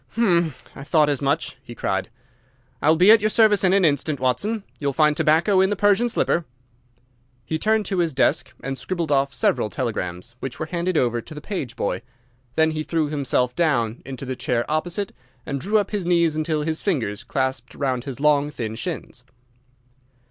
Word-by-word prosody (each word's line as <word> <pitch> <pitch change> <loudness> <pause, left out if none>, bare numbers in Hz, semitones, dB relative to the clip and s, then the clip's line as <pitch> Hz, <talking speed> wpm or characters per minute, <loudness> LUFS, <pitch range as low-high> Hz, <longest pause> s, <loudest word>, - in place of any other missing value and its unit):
"Hum! 170 - +2 0.2
I 135 - -8
thought 150 0 +3
as 145 -1 0
much!" 140 +1 -1
he 120 -3 -11
cried. 95 -3 -2 0.7
"I 145 - +3
will 160 - +6
be 180 +6 +6
at 225 -1 +7
your 215 - +2
service 215 -2 +4
in 185 - +4
an 195 -1 +4
instant, 145 -1 +1
Watson. 195 - 0 0.2
You 145 - -2
will 140 - 0
find 150 +1 +3
tobacco 165 +5 +3
in 190 - +3
the 205 - 0
Persian 205 +4 +3
slipper." 170 -6 +1 1.0
He 160 +5 -2
turned 220 +1 +2
to 190 0 -1
his 170 -2 +1
desk 140 +3 +1
and 135 -1 -4
scribbled 170 -5 -3
off 140 0 +2
several 110 - +1
telegrams, 105 -3 -4
which 130 -1 -5
were 155 - -3
handed 170 +1 -1
over 120 -3 +1
to 155 - -12
the - - -6
page 145 - -5
boy. 100 - -2 0.5
Then 160 0 +3
he 155 -1 -3
threw 155 -1 -1
himself 130 -4 0
down 120 -9 +1
into 135 0 -7
the 130 0 -3
chair 120 -1 -1
opposite, 175 +6 -2 0.3
and 140 -1 -3
drew 210 +4 +2
up 205 -2 0
his 200 -5 -2
knees 170 -3 +3
until 155 -1 -1
his 160 +1 -2
fingers 120 - -1
clasped 130 -1 -2
round 130 -3 -1
his 135 -3 -6
long, 145 0 +3
thin 115 -6 -5
shins. 130 -1 -5
155 Hz, 195 wpm, -23 LUFS, 130-175 Hz, 1.0 s, at